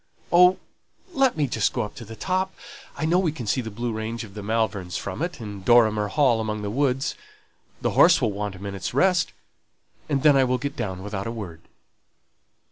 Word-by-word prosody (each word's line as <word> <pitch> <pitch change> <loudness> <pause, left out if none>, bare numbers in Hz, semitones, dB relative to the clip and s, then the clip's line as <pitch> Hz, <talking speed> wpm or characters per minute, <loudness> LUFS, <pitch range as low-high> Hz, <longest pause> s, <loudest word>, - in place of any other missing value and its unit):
"Oh, 180 +1 +7 0.6
let 270 - +2
me 150 - +2
just 115 -5 0
go 120 - -1
up 105 - -7
to 115 - -8
the 115 +2 -9
top! 185 - -1 0.4
I 155 - -1
know 170 +3 +3
we 175 -4 +1
can 135 -6 -7
see 115 +5 0
the 110 - -6
blue 115 +2 -3
range 110 +2 -4
of 105 -3 -11
the 105 - -7
Malverns 100 -5 -1
from 100 +8 -5
it, 175 +1 -3
and 105 -4 -7
Dorrimer 110 -2 +4
Hall 115 +1 +2
among 105 -1 -3
the 100 - -3
woods; 135 +1 0 0.7
the - - +1
horse - - +6
will - - +1
want 100 -1 -4
a - - -12
minute's 100 +3 -5
rest, 180 +3 +3 0.8
and 135 -2 0
then 150 -2 +6
I 135 - +5
will 125 0 +1
get 140 +3 -4
down 95 -2 -4
without 100 0 -4
a - - -3
word." 95 -8 -7
115 Hz, 210 wpm, -24 LUFS, 105-140 Hz, 0.8 s, Oh